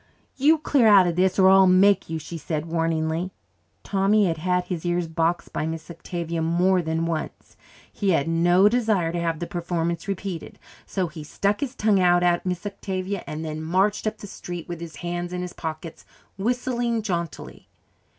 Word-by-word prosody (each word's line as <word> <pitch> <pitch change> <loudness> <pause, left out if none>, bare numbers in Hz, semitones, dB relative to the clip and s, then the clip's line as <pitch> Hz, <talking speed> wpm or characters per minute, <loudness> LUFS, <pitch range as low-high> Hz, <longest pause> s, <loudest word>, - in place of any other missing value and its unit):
"You 300 +4 +4
clear 280 -6 +3
out 200 -3 +7
of 175 -1 0
this 185 +1 +2
or 190 -1 +6
I'll 190 0 +7
make 190 +1 +4
you," 160 - -2
she 160 +2 -8
said 160 -1 -3
warningly. 165 +1 -1 0.5
Tommy 200 +1 +2
had 165 -3 0
had 180 +2 0
his 180 -3 -5
ears 175 -1 0
boxed 165 +1 -1
by 155 - -2
Miss 160 +1 -6
Octavia 170 0 -4
more 175 +3 +2
than 160 0 -1
once. 165 -2 -5 0.4
He 200 - -1
had 165 -4 +2
no 175 +4 +4
desire 215 -7 +1
to 175 - -2
have 165 -1 -1
the 175 - -4
performance 170 -1 -3
repeated, 195 -3 -5 0.3
so 190 -2 -1
he 155 -2 -8
stuck 200 +7 -1
his 270 -2 -4
tongue 210 -4 +2
out 175 -1 +4
at 175 +1 +1
Miss 180 +1 -3
Octavia 195 -1 -4
and 155 +1 -5
then 155 0 -4
marched 190 +7 +1
up 215 - -2
the - - -10
street 175 -3 -7
with 175 -1 -6
his 165 -3 -8
hands 175 +1 -3
in 180 0 -3
his 180 - -6
pockets, 160 0 -7 0.3
whistling 240 +1 -1
jauntily. 170 -5 -5
175 Hz, 185 wpm, -24 LUFS, 165-195 Hz, 0.5 s, out